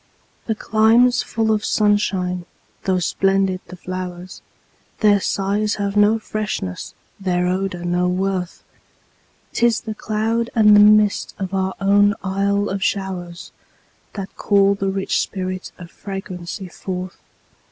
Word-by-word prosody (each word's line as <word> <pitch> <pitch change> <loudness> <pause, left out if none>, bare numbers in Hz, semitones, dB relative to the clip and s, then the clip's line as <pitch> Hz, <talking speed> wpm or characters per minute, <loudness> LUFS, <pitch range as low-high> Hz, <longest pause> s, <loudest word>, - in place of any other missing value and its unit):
In 220 - 0
climes 225 +4 +3
full 220 -1 -1
of 215 -1 +1
sunshine, 190 -4 +1 0.4
tho' 190 -1 +2
splendid 195 +1 +1
the 185 - -9
flowers, 185 0 -7 0.6
Their 205 -2 +5
sighs 200 +2 0
have 200 -1 -2
no 205 +2 +4
freshness, 210 - -4 0.2
their 180 -2 0
odor 185 -1 -2
no 175 +1 +1
worth; 185 0 -2 0.9
'Tis 235 -1 +2
the 220 - -5
cloud 225 +2 -1
and 210 -2 +6
the - - +7
mist 210 0 +4
of 190 -1 -4
our 190 0 -1
own 205 +1 +4
Isle 200 +1 0
of 195 0 -3
showers, 185 -3 -3 0.6
That 195 -2 -7
call 200 -1 +3
the 195 -1 -2
rich 195 0 0
spirit 185 -1 -4
of 175 -2 -11
fragrancy 195 -1 -7
forth. 185 0 -6
195 Hz, 130 wpm, -20 LUFS, 185-210 Hz, 0.9 s, the